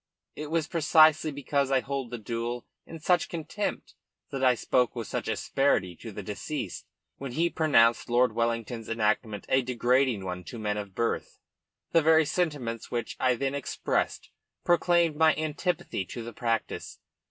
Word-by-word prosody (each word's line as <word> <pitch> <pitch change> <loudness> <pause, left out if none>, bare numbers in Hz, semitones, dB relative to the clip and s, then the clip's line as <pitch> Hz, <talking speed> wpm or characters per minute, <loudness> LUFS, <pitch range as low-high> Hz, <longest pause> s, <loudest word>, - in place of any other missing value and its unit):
It 150 0 -6
was 165 -1 +1
precisely 155 -1 +5
because 140 0 -1
I 135 -1 +3
hold 135 -1 -4
the 120 - -5
duel 115 +2 -4 0.2
in 165 - -8
such 175 +2 +2
contempt 170 +5 -4 0.4
that 135 -1 -3
I 125 -1 +5
spoke 125 +1 +1
with 115 -3 -4
such - - -3
asperity 95 -10 +1
to - - -8
the - - -7
deceased - - -5 0.3
when 135 -3 -6
he 170 +4 +1
pronounced 120 -10 +3
Lord 120 0 +4
Wellington's 115 0 -2
enactment 110 -1 0
a 130 - +3
degrading 125 -3 +1
one 90 -1 -4
to 120 - -8
men 105 -1 -2
of 100 -2 -6
birth. 115 0 -2 0.5
The 165 - +5
very 160 0 +5
sentiments 145 -10 -2
which 120 -1 -3
I 130 -1 +3
then 135 +3 -1
expressed 140 -1 -2 0.3
proclaimed 170 -2 +3
my 160 0 +5
antipathy 155 - -2
to 120 +6 -7
the 115 0 -8
practice. 115 -1 -2
130 Hz, 160 wpm, -28 LUFS, 115-155 Hz, 0.5 s, precisely